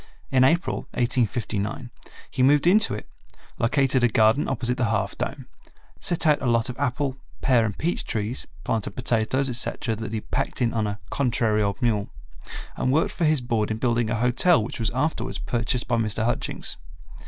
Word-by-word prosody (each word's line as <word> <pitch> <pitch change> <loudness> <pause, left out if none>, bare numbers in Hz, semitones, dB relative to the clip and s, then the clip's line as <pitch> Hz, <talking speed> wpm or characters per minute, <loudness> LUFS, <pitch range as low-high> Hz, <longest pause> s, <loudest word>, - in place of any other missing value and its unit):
In 130 -1 +5
April, 165 +7 +2 0.2
1859, 120 -1 -1 0.4
he - - -1
moved 140 +3 +4
into 190 - +4
it, 105 - -8 0.5
located 130 +1 +2
a - - +6
garden 110 +4 +3
opposite 125 -2 -1
the 125 - +1
Half 100 -3 -1
Dome, - - -4 0.5
set 175 -1 0
out 150 -2 +4
a 130 - -1
lot 115 +2 +2
of 125 - -7
apple, 135 0 -1 0.2
pear 125 -4 +3
and 105 -3 -3
peach 170 +2 -1
trees, 110 +3 -2 0.2
planted 110 -2 -1
potatoes, 125 +2 0
etc., 120 -2 -1
that 110 +1 -5
he 115 - -2
had 105 - -9
packed - - -1
in 120 -2 +1
on 110 -2 0
a 105 +1 -4
"contrary 115 -5 +1
old 100 -1 -1
mule," 105 -4 +1 0.7
and 130 - 0
worked 155 +4 +2
for 170 - -1
his 155 -3 +3
board 115 -4 0
in 110 - -2
building 120 -1 +1
a 115 - 0
hotel 125 - +3
which 115 - -6
was 110 -2 +1
afterwards 150 +6 -2
purchased 120 +1 -1
by 120 - +1
Mr. 110 0 0
Hutchings. 120 - -2
120 Hz, 185 wpm, -24 LUFS, 110-135 Hz, 0.7 s, a